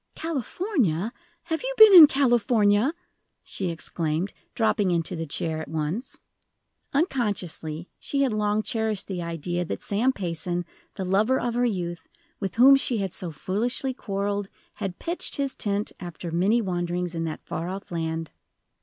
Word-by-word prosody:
"California! 260 - -1 0.3
Have 320 -1 -2
you - - -3
been 435 -2 +10
in 335 -5 +12
California?" 240 -1 +3 0.5
she 190 -2 -3
exclaimed, 165 +2 -2 0.2
dropping 215 -3 +2
into 170 0 0
the 165 -1 -4
chair 160 +2 -2
at - - -7
once. 160 - -3 0.7
Unconsciously, 200 - -1
she 280 -1 0
had 260 -5 +1
long 210 0 +1
cherished 220 -4 -1
the 185 -3 -4
idea 170 +1 -3
that 170 - -4
Sam 225 +6 +2
Payson, 175 -3 -3 0.3
the 190 - -3
lover 210 +8 +2
of 240 -1 -1
her 245 +1 +2
youth, 175 - -4 0.3
with 195 -2 -3
whom 260 +4 +8
she 260 -3 +1
had 195 -3 -2
so 180 - -5
foolishly 225 - -2
quarreled, 200 -3 -2 0.3
had 195 -3 -3
pitched 340 +2 -3
his 275 -1 -2
tent, 205 0 -1
after 175 -1 -7
many 200 +8 +2
wanderings, 175 -1 -2
in 165 -1 -2
that 155 - -6
far 165 +2 -4
off 195 +1 -7
land. 165 -1 -3
200 Hz, 155 wpm, -26 LUFS, 175-240 Hz, 0.7 s, in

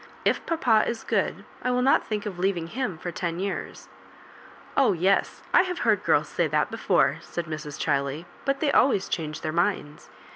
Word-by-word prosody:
If - - +2
papa 245 -10 +3
is 235 -1 -3
good, - - -1 0.2
I 250 - -1
will 250 0 +1
not 270 - +4
think 210 -1 -3
of 190 -4 -5
leaving 180 -3 0
him 210 -1 -3
for 175 +2 -5
ten 170 -1 -3
years." 195 0 -4 0.9
Oh 265 -7 +4
yes; 185 +3 +1
I - - +8
have 365 -1 -3
heard - - +3
girls - - +3
say - - 0
that - - 0
before," - - +2
said 175 - -5
Mrs. 155 -2 -6
Chiley; 140 +2 -1 0.2
"but 275 0 -1
they 295 -3 +2
always 255 -9 +3
changed 155 -2 -4
their 155 - -1
minds. 170 -4 -1
190 Hz, 185 wpm, -26 LUFS, 165-250 Hz, 0.9 s, I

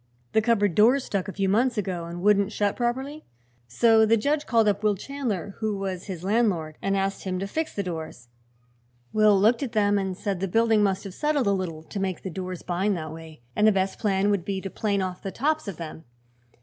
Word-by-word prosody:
"The 220 - +3
cupboard 210 -4 +2
doors 240 - +4
stuck, 200 -2 -2
a - - -4
few 195 0 -1
months 235 +5 +2
ago, 185 -4 -2
and 170 +1 -7
wouldn't 200 0 +3
shut 205 -2 0
properly. 265 +5 -2 0.4
So 225 - +4
the 225 +1 +4
judge 290 +6 0
called 225 -3 +3
up 205 -1 +1
Will 210 -1 +2
Chandler, 210 - -4
who 215 -2 -1
was 190 -2 -4
his 180 -4 -6
landlord, 190 -7 0
and 195 0 0
asked 195 0 -2
him 185 -1 -2
to 190 - -2
fix 315 +11 -3
the 200 - -1
doors. 160 -8 -6 0.9
Will 215 -2 +5
looked 225 +6 +3
at 260 -5 -3
them 205 -2 +3
and 190 -2 -3
said 200 -3 -2
the 195 - -1
building 225 +2 +3
must 195 -2 +1
have 195 -3 -8
settled 295 +2 0
a 200 - +3
little, 175 -5 -3
to 200 - -6
make 190 -2 -3
the 190 - -4
doors 185 0 -6
bind 190 +2 0
that 155 -1 -6
way, 160 -5 -12
and 210 - +4
the - - +7
best 190 -1 -1
plan 200 -2 +1
would 200 -4 0
be 195 +1 -2
to 195 - -6
plane 200 -3 0
off 185 -1 -5
the 195 - -4
tops 310 +4 -1
of 195 -6 -5
them. 160 -1 -8
200 Hz, 225 wpm, -25 LUFS, 185-220 Hz, 0.9 s, the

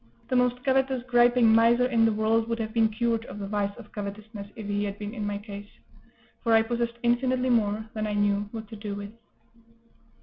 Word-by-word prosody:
The 255 - 0
most 250 0 +2
covetous, 265 -2 +1
griping 240 -2 +5
miser 230 +2 +5
in 235 -3 +3
the 225 - +3
world 220 +1 +1
would 230 - -1
have 220 -1 -4
been 225 -2 +3
cured 230 +1 0
of - - -9
the 200 - -5
vice 200 0 -2
of - - -13
covetousness 205 -1 -7
if 220 -3 -7
he 205 0 -1
had 200 0 -4
been 210 +1 -6
in 215 -4 -4
my 205 0 -2
case; 205 0 -9 0.7
for 230 -2 +2
I 225 0 +6
possessed 235 0 -2
infinitely 250 +1 +2
more 215 -2 +1
than 215 -1 -2
I 210 - -2
knew 205 0 +1
what 220 -2 -7
to - - -8
do 205 -1 -5
with. 205 0 -7
225 Hz, 210 wpm, -27 LUFS, 205-240 Hz, 0.7 s, I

